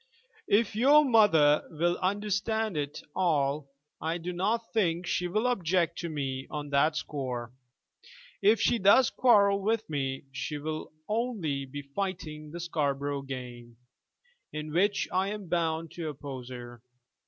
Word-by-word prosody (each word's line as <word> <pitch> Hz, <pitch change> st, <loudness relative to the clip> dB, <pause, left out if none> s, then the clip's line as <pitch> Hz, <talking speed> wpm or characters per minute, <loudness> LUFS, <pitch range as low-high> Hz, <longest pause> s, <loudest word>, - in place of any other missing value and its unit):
"If 220 Hz, +1 st, +2 dB
your 285 Hz, +6 st, +6 dB
mother 180 Hz, -, +5 dB
will 175 Hz, +2 st, 0 dB
understand 205 Hz, +2 st, 0 dB
it 145 Hz, -1 st, -3 dB
all, 145 Hz, -5 st, +1 dB, 0.3 s
I 160 Hz, +2 st, -1 dB
do 175 Hz, +1 st, -5 dB
not 215 Hz, +6 st, -1 dB
think 180 Hz, -5 st, +1 dB
she 180 Hz, +1 st, 0 dB
will 215 Hz, +6 st, 0 dB
object 185 Hz, -8 st, +1 dB
to 170 Hz, -, -3 dB
me 135 Hz, -3 st, -3 dB
on 145 Hz, -1 st, -5 dB
that 150 Hz, +3 st, +3 dB
score. 125 Hz, -6 st, -4 dB, 0.9 s
If 210 Hz, +2 st, +5 dB
she 235 Hz, -, +2 dB
does 210 Hz, +6 st, +6 dB
quarrel 200 Hz, -5 st, +4 dB
with 220 Hz, +2 st, 0 dB
me, 135 Hz, -2 st, -2 dB
she 145 Hz, +3 st, -4 dB
will 155 Hz, +1 st, -5 dB, 0.2 s
only 210 Hz, -, -1 dB
be 145 Hz, +2 st, -7 dB
fighting 155 Hz, -1 st, -5 dB
the 170 Hz, +3 st, -7 dB
Scarborough 145 Hz, -4 st, -1 dB
game, 125 Hz, -3 st, -8 dB, 0.7 s
in 155 Hz, 0 st, -5 dB
which 200 Hz, +4 st, +2 dB
I 190 Hz, +2 st, +1 dB
am 205 Hz, -2 st, -6 dB
bound 165 Hz, -2 st, -1 dB
to 165 Hz, -3 st, -4 dB
oppose 135 Hz, -3 st, -7 dB
her. 120 Hz, -2 st, -9 dB
165 Hz, 140 wpm, -29 LUFS, 145-200 Hz, 0.9 s, your